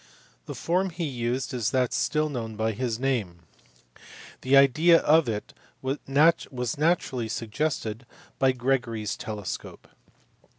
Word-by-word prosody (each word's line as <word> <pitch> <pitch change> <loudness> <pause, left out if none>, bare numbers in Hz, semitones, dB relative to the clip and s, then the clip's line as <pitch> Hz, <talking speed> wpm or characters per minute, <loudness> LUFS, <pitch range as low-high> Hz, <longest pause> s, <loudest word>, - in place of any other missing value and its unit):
The - - -6
form 185 +3 0
he 175 0 -5
used 125 -3 -2
is 115 -4 0
that 125 -1 0
still 155 0 +1
known 115 -6 -5
by 110 +1 0
his 115 +1 -2
name; 115 -11 -1 1.0
the 135 +2 +4
idea 155 +5 +6
of 155 -3 +4
it 105 -2 -4 0.3
was 135 +2 -2 0.8
naturally 150 -8 0
suggested 115 0 -3 0.3
by 135 -1 +4
Gregory 125 -3 -1
s 105 - -2
telescope. 105 -3 -6
125 Hz, 125 wpm, -26 LUFS, 110-145 Hz, 1.0 s, idea